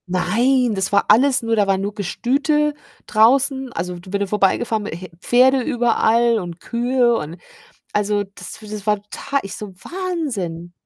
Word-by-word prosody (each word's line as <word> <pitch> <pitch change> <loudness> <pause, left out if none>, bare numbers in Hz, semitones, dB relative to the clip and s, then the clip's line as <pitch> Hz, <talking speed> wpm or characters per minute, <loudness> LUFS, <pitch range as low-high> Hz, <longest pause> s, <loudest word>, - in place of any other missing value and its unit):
Nein, 240 +7 +2
das 190 -1 -1
war 200 - +3
alles 265 +3 +5
nur 230 0 +1
da 205 -2 +2
war 195 -1 +2
nur 200 +2 -3
Gestüte 275 - 0 0.3
draußen. 265 +4 +3
Also, 175 +1 -4
d 185 +1 -13
wenn 200 - -1
du 200 - 0
vorbeigefahren 210 +2 +1
he 185 -1 -7
Pferde 255 +5 +4
überall 235 -3 +2
und 175 -2 -7
Kühe 240 +2 +1
und, 160 -4 -5 0.6
also, 205 0 +1
das - - -8
w 215 - -11
das 210 -1 -7
war 210 0 +3
tota 280 0 -2
ich 195 - -6
so: 210 - -7
„Wahnsinn.“ 220 - -4
220 Hz, 165 wpm, -20 LUFS, 195-255 Hz, 0.6 s, alles